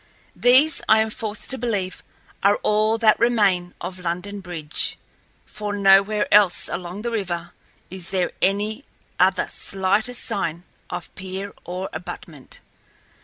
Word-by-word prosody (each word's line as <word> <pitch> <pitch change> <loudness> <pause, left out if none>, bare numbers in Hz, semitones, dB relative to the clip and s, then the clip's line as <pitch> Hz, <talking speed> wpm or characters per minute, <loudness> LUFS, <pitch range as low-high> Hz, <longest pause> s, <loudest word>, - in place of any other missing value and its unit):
These, 265 +5 +4
I 220 - +7
am 220 0 +1
forced 215 -1 -5
to 265 - 0
believe, 205 -6 -2 0.4
are 200 +1 +5
all 215 +1 +3
that 220 -2 +4
remain 200 -7 +2
of 185 +1 -6
London 180 +4 -3
Bridge, 170 -5 -2 0.5
for 210 -1 -5
nowhere 200 +1 +5
else 200 -3 +5
along 180 +3 -5
the 235 - -2
river 175 -6 -3 0.4
is 190 -1 -5
there 185 -2 0
any 210 +6 +1 0.4
other 185 +1 +3
slightest 200 +6 -1
sign 175 -6 -2 0.3
of 145 -6 -6
pier 190 +2 -6
or 180 +2 -4
abutment. - - -8
200 Hz, 130 wpm, -23 LUFS, 180-215 Hz, 0.5 s, I